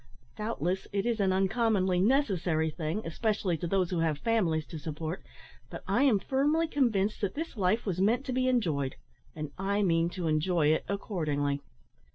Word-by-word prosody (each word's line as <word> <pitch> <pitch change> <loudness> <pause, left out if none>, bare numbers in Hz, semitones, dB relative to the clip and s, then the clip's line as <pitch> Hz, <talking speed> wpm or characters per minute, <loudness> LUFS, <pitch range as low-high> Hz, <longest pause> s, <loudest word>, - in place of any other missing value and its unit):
Doubtless, 200 -4 -2
it 200 +1 -1
is 235 -2 0
an 195 -2 +2
uncommonly 190 -1 +2
necessary 185 - +2
thing, 165 +7 -3
especially 195 +1 0
to 170 - -3
those 185 0 +1
who 175 - 0
have 160 -3 +1
families 170 -6 +1
to 160 - -6
support; 155 +3 -5 0.5
but - - -8
I - - +2
am 265 -7 +5
firmly 290 +10 +1
convinced 220 -9 +1
that 200 -3 -1
this 320 -1 -4
life 205 +2 +1
was 185 -3 -1
meant 235 +7 +2
to 260 - -3
be 255 0 +1
enjoyed, 160 - 0 0.4
and 155 -2 -5
I 200 +2 +1
mean 165 -2 +2
to 180 - -2
enjoy 155 0 +2
it 155 - +1
accordingly." 150 -8 -1
190 Hz, 175 wpm, -29 LUFS, 165-225 Hz, 0.5 s, am